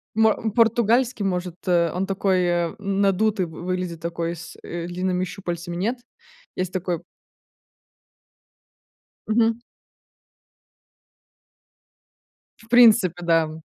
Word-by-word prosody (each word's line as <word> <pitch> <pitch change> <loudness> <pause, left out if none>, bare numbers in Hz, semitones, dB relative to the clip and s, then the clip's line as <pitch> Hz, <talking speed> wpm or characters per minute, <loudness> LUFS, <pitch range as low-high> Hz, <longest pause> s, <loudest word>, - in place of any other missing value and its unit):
Мо 220 -1 +5 0.2
португальский, 235 0 +3
может? 180 -2 -2
Э, 170 -2 +3
он 190 +2 -2
такой 180 -3 +1
надутый 200 0 +1
вы 160 -1 -10
выглядит, 180 -2 -3
такой 170 0 -3
с, 165 +1 -10
э, 170 0 -5
длинными 180 +1 -1
щупальцами, 175 -2 -5
нет? 225 +8 -1 0.6
Есть 185 0 -3
такой 180 -2 -2 2.3
Мгм. 225 +1 +2 3.0
В 225 - -19
принципе 230 -7 +6
да, 165 -1 +3
м. 155 +1 -8
185 Hz, 95 wpm, -23 LUFS, 170-215 Hz, 3.0 s, принципе